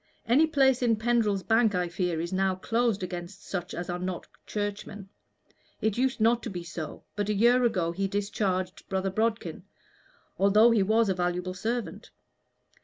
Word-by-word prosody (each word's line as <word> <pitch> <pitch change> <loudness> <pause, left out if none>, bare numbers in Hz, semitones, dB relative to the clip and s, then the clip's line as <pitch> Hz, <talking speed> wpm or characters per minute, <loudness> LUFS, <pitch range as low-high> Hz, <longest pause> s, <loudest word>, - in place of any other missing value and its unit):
Any 280 +7 +4
place 265 -4 +3
in 235 -2 +3
Pendrell's 220 -3 +1
Bank, 225 -2 +3
I 180 -1 0
fear, 175 -1 -2
is 170 +2 -3
now 190 0 +1
closed 225 +1 0
against 180 +1 -7
such 180 -1 -4
as 175 +1 -4
are 175 0 -3
not 180 0 -4 0.2
Churchmen. 205 -1 -4 0.7
It 220 -2 0
used 260 +1 0
not 230 +2 +3
to - - -5
be 180 -4 -5
so, 165 -2 -7
but 205 0 -2
a 210 - +1
year 240 +4 +4
ago 185 -8 +1
he 195 +3 -1
discharged 195 -2 -2
Brother 190 0 -1
Bodkin, 220 +3 -1 0.8
although 210 +4 +6
he 225 -3 +3
was 220 +3 +3
a 190 - +2
valuable 180 0 -2
servant. 230 +5 -4
200 Hz, 170 wpm, -28 LUFS, 185-230 Hz, 0.8 s, although